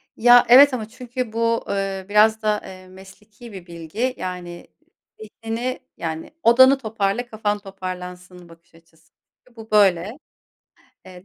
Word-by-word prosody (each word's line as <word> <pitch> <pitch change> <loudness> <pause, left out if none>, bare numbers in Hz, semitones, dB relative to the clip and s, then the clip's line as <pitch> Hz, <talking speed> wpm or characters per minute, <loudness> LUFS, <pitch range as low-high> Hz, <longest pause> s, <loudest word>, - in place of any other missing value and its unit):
Ya 245 +1 +6
evet 270 +3 +8
ama 225 -4 -4
çünkü 250 0 -7
bu, 230 0 0
ııı, 195 -1 -4
biraz 215 +1 +3
da, 210 -1 0
ııı, 185 -1 -12
mesleki 205 +5 -15
bir 185 -3 -10
bilgi. 170 +10 -4
Yani 180 -2 -7 0.5
zihnini 225 +4 -5 0.2
yani 160 - -6
odanı 260 +4 +6
toparla, 220 -1 -2
kafan 210 -2 -3
toparlansın 180 -2 -9
bakış 165 0 -20
açısı. 165 -1 -26 0.4
Çünkü 245 - -25
bu 225 -1 -13
böyle. 200 +1 +2 0.9
Eee, 180 -1 -14
210 Hz, 135 wpm, -21 LUFS, 185-230 Hz, 0.9 s, evet